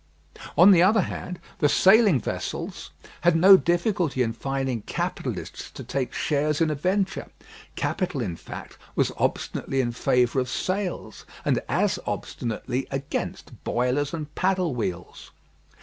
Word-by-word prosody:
On 180 +4 +9
the 175 -3 +6
other 210 +4 +5
hand, 180 0 -5 0.2
the 150 - +4
sailing 195 - +5
vessels - - -5 0.3
had 175 -1 +4
no 190 +4 +9
difficulty 175 - +1
in 115 -1 -2
finding 135 -1 -2
capitalists - - -4
to - - -9
take 135 -2 -2
shares 150 0 0
in 160 -2 +2
a - - +1
venture. 190 +6 -1 0.5
Capital, 180 -7 -2
in 95 -9 -2
fact, - - -10 0.2
was - - +2
obstinately 135 - -1
in 120 -2 +1
favour 125 +2 +2
of 125 -1 -1
sails, 185 +3 -3 0.2
and - - +2
as - - +1
obstinately 120 +3 -3
against 135 0 -5
boilers 125 +4 0
and 150 -3 -6
paddle 185 -4 +1
wheels. 90 -7 -5
150 Hz, 135 wpm, -25 LUFS, 125-185 Hz, 0.5 s, On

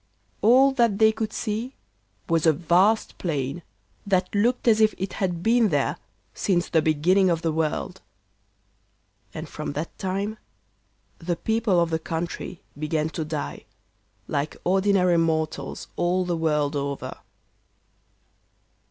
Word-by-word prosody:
All 260 +5 +6
that 235 -6 +2
they 220 0 +5
could 220 0 -3
see 230 +4 -3 0.5
was 165 -1 +2
a 160 - +6
vast 180 +7 +2
plain, 145 -2 -2 0.4
that 185 -2 0
looked 240 +5 +1
as 220 -1 +5
if 215 0 +4
it 190 0 -4
had 175 -3 -1
been 230 0 +4
there 145 -4 +1 0.4
since 180 -3 0
the 160 - +3
beginning 175 +5 +3
of 170 -1 0
the 165 - +1
world. 160 +4 -2 1.3
And 155 0 -7
from 155 -2 -5
that 150 +3 -5
time 200 +3 -2 0.8
the 175 0 -2
people 220 -2 +1
of 170 -1 +1
the 160 - 0
country 170 +2 -5
began 155 +1 -1
to 160 +1 -3
die 155 -1 -5 0.6
like 145 +1 -2
ordinary 190 -1 +3
mortals 160 -4 -2
all 180 +1 +1
the 175 -1 -1
world 150 -3 0
over. 140 -1 -4
175 Hz, 135 wpm, -25 LUFS, 160-205 Hz, 1.3 s, All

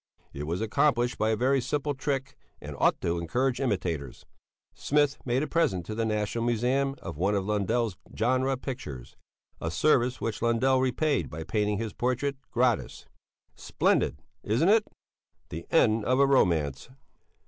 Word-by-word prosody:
It 75 +2 -5
was 85 +5 -2
accomplished 120 +1 +1
by 110 - +2
a 110 - +2
very 130 +4 +2
simple 145 +3 -1
trick 135 0 -3 0.2
and - - -8
ought - - +3
to 85 0 -1
encourage 120 +10 0
imitators. 85 - -2 0.5
Smith 145 -1 +1
made 125 +2 +1
a - - -2
present 100 - +1
to 110 - -5
the 115 +1 -1
National 105 +2 -1
Museum 125 +4 +1
of 85 -4 -6
one 100 +3 +2
of 95 -1 -1
Lundell's 105 0 0 0.2
genre 130 +3 +1
pictures, 75 - -7 0.4
a 80 - -3
service 125 - +2
which 115 - -3
Lundell 120 +3 +2
repaid 140 +2 0
by 80 +2 -6
painting 105 +3 0
his 110 -1 -4
portrait 130 +3 -1
gratis! 120 -2 0 0.5
Splendid! - - 0 0.2
Isn't 120 - +2
it? 215 0 +4 0.6
The 85 +2 -7
end 115 -8 +3
of 130 +2 +2
a 140 - +6
romance. 80 - +1
120 Hz, 155 wpm, -28 LUFS, 100-135 Hz, 0.6 s, a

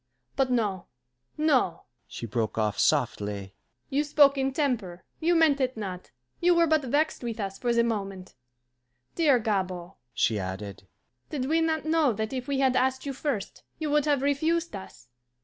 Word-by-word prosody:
But 270 -2 +1
no, 210 -7 0 0.5
no," 265 - +2 0.2
she - - -7
broke 115 -1 -2
off 105 -2 0
softly, 105 -8 0 0.4
"you 285 +2 +2
spoke 290 -1 +5
in 270 0 0
temper, 235 - -2 0.2
you 340 +2 +2
meant 310 -4 +4
it 255 -2 0
not, 185 -4 -6 0.3
you 350 0 +4
were 340 0 +5
but 315 -1 +3
vexed 290 +4 0
with 235 -2 -4
us 195 -1 -4
for 245 - 0
the 235 0 +3
moment. 195 -5 -3 0.8
Dear 300 -6 +4
Gabord," 185 -5 -2 0.2
she 110 -3 +1
added, 95 +1 -6 0.4
"did 270 -4 -2
we 320 +4 +2
not 320 -1 0
know 315 -5 +3
that 220 +3 -3
if 255 -1 -4
we 280 -1 0
had 265 -1 +2
asked 260 +1 +1
you 275 - -3
first, 265 -7 -3 0.2
you 310 -2 -2
would 295 -1 +3
have 285 -3 +1
refused 315 +2 0
us? 190 -10 -10
255 Hz, 170 wpm, -27 LUFS, 185-295 Hz, 0.8 s, spoke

